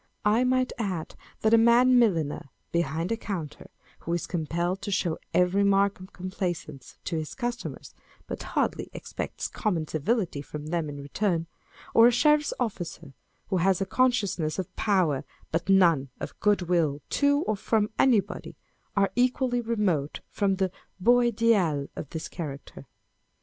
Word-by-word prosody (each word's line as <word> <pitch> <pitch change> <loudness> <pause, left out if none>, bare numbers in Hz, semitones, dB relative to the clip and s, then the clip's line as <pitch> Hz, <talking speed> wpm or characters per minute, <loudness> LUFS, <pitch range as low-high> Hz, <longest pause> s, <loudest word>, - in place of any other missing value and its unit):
I 215 +4 +4
might 255 0 +1
add, 185 -7 -3 0.3
that 220 +1 +3
a 230 - +7
man 245 +2 +6
milliner 165 - +1 0.2
behind 165 +2 -1
a - - +2
counter, 180 -10 -6 0.3
who 170 - -4
is 175 - -1
compelled 175 +3 -2
to - - -4
show 180 -4 0
every 180 +3 +3
mark 200 0 +3
of 185 +2 -11
complaisance 180 -6 -5
to 165 - -2
his 155 -1 -5
customers, 240 -1 -5 0.3
but - - -6
hardly - - -1
expects - - -5
common 175 -8 -2
civility 170 - -1
from 150 +1 -8
them 165 -1 -2
in 145 -1 -7
return; 170 +2 -1 0.5
or 230 +1 +8
a - - +5
sheriff's 300 +4 +3
officer, 175 - -4 0.4
who 190 - +1
has 185 +1 +2
a 195 - 0
consciousness 200 -10 +1
of 185 -2 -5
power, 180 -10 +1 0.3
but 165 +3 -2
none 170 -8 +4
of - - -7
good 205 -3 +2
will 165 -5 +1 0.2
to 285 +1 +4
or 215 - 0
from 210 +1 0
anybody, 215 -7 +1 0.4
â€" - - +5
are 195 - +1
equally 250 0 +2
remote 205 -11 -1
from 200 -2 +1
the 190 -1 0 0.3
beau 240 +6 +5
ideal 215 -11 +2
of 145 - -6
this 160 -1 -5
character. 145 -4 -8
190 Hz, 155 wpm, -27 LUFS, 165-225 Hz, 0.5 s, or